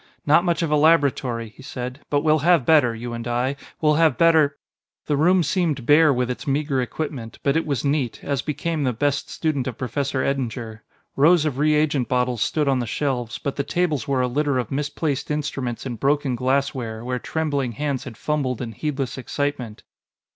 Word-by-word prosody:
"Not 155 +4 +5
much 170 -1 0
of 160 - -1
a - - +4
laboratory," 140 -7 +2
he 110 - -16
said, 125 0 -6
"but 145 -1 +2
we'll 155 0 +3
have 165 -3 +3
better, 145 -8 +4
you 120 +1 -6
and 115 0 -5
I; 125 +3 0 0.2
we'll 150 -1 +3
have 155 -7 +4
better 160 -4 +4 0.2
" - - -71
The 150 - 0
room 175 +5 +4
seemed 155 -9 0
bare 150 +2 +6
with 125 -1 0
its 125 - -7
meager 140 -1 0
equipment, 125 -3 -5
but 140 - +2
it 160 - 0
was 140 -1 -1
neat, 140 -4 0
as 140 -2 -1
became 155 +1 -2
the 130 -2 +1
best 145 +4 -1
student 145 -6 -1
of 125 - -5
Professor 130 +2 -2
Eddinger. 120 -5 -3 0.3
Rows 160 +3 +5
of 140 -3 -2
reagent 150 -3 +2
bottles 125 -2 0
stood 150 -2 +1
on 135 -2 +2
the 120 - -3
shelves, 125 -3 -2
but 140 - -4
the 140 - 0
tables 155 -3 -1
were 135 -2 +1
a 125 - +1
litter 140 +2 0
of 125 -4 -2
misplaced 145 0 -2
instruments 140 -5 -3
and 120 -4 -5
broken 140 -1 +1
glassware 125 -3 -1
where 125 0 -2
trembling 145 -6 -2
hands 140 +1 -2
had 120 -4 -9
fumbled 140 -5 -1
in 120 -3 -4
heedless 135 -1 -3
excitement. 130 -4 -3
140 Hz, 195 wpm, -23 LUFS, 125-150 Hz, 0.3 s, bare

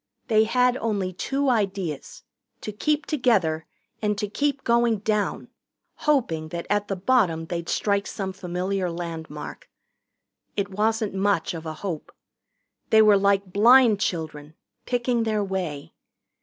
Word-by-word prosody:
They 220 -1 +5
had 250 +2 +2
only 200 -6 -2
two 275 +10 -1
ideas 195 - -2 0.4
to 215 - -5
keep 300 +8 0
together 200 - +1 0.3
and 210 -1 0
to 210 - -2
keep 280 +6 -1
going 235 -1 +3
down, 210 0 -1 0.4
hoping 230 - 0
that 170 +1 -5
at 205 0 +1
the 195 - -2
bottom 185 -6 +2
they'd 170 0 -4
strike 200 -1 0
some 190 -2 -4
familiar 185 0 -2
landmark. 165 -3 -7 0.9
It 200 0 -1
wasn't 215 +1 0
much 195 -3 +1
of 165 -1 -6
a 155 - -3
hope. 170 -6 -4 0.8
They 220 0 +6
were 210 -1 +6
like 195 -1 +2
blind 230 0 +6
children, 155 -5 -3 0.3
picking 245 -1 0
their 215 -2 0
way. 180 -7 -4
200 Hz, 135 wpm, -25 LUFS, 175-225 Hz, 0.9 s, They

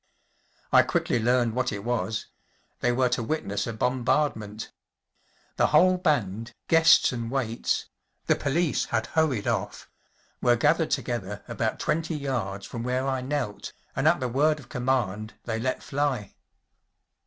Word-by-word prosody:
I - - +8
quickly 120 - 0
learned 120 0 +2
what 125 +1 0
it 100 -2 -5
was. 110 -2 -1 0.5
They 120 - +2
were 125 +1 +2
to 120 0 0
witness 110 -5 -2
a 115 - -3
bombardment 125 -3 -1 0.9
The - - +4
whole 185 0 +5
band, 120 - -1
guests 165 0 +6
and 115 -2 -4
waits‚ÄĒthe 120 -3 -2
police 155 +3 +1
had - - -1
hurried 155 -10 0
off - - -2 0.5
‚ÄĒwere 120 -1 +4
gathered 155 +4 +3
together 105 -5 -3
about - - -2
twenty 160 +1 -1
yards 115 -9 -3
from 115 - -6
where 125 +2 -1
I 130 -1 -1
knelt, 130 -6 -3 0.2
and 135 +3 +1
at 170 +2 +4
the 125 - -1
word 150 +5 +2
of 125 - -14
command 115 -4 -1
they 115 -1 -3
let 130 +2 -2
fly. 135 -7 -1
125 Hz, 140 wpm, -26 LUFS, 115-145 Hz, 0.9 s, I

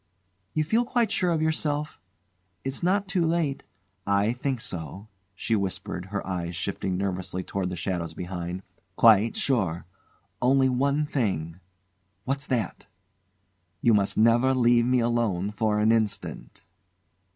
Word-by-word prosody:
"You 155 - +2
feel 220 +10 +2
quite 235 -3 +1
sure 185 -5 +1
of 160 -2 +1
yourself? 150 - -1 0.6
It's 135 0 -3
not 195 +3 +1
too 185 -2 +1
late 160 -4 0 0.3
" 100 -1 -39 0.2
"I 110 +3 +1
think 130 0 -2
so," 95 +2 -6 0.3
she 110 +4 0
whispered, 95 -2 -3
her 100 +1 -4
eyes 90 -2 -3
shifting 95 +1 -2
nervously 95 -1 -3
toward 95 -1 -3
the 90 - -4
shadows 85 -2 -3
behind. 90 0 -5 0.3
"Quite 110 0 +5
sure, 95 - 0 0.6
only 130 +1 +4
one 140 +4 +1
thing 95 - -2 0.3
" 90 0 -46
"What's 140 +1 -2
that?" 120 -8 -2 1.0
"You 115 - +5
must 100 -2 +2
never 120 +4 +4
leave 120 -1 +4
me 125 -1 +3
alone 115 -5 0
for 105 0 0
an 105 +1 +4
instant." 110 -2 -2
110 Hz, 140 wpm, -26 LUFS, 95-135 Hz, 1.0 s, Quite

